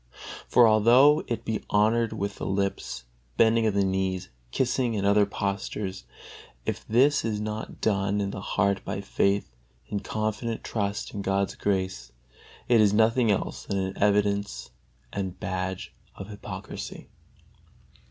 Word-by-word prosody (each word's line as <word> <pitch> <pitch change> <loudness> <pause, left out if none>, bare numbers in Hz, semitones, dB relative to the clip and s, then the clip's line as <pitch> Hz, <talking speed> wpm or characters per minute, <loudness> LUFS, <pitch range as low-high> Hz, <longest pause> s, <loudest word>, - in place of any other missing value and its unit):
For 120 -1 +6
although 120 +8 +6
it 115 -1 -3
be 110 -1 -2
honored 110 +2 +3
with 100 +1 -4
the - - -5
lips, 95 -10 -2 0.3
bending 115 0 +4
of 105 - 0
the 100 -1 +3
knees, 95 -1 -1 0.2
kissing 125 - 0
and 100 -1 -1
other 100 0 +4
postures, 100 -1 -3 0.6
if - - -3
this 135 +6 +4
is 110 -2 -1
not 105 +1 -5
done 100 -1 +1
in 100 -1 -1
the 100 - -6
heart 100 0 0
by 95 - -4
faith, 100 -7 0 0.4
in 105 - -1
confident 110 +2 -3
trust 100 -2 -3
in 100 - -4
God's 95 0 0
grace, 95 -11 -2 0.6
it 120 -2 +5
is 105 -1 +4
nothing 115 +2 +3
else 100 - -1
than 100 - -1
an 95 0 -1
evidence 100 -10 +1 0.4
and 95 -2 -4
badge 95 -1 -4 0.2
of 95 - -8
hypocrisy. 105 - -7
100 Hz, 140 wpm, -27 LUFS, 95-110 Hz, 0.6 s, For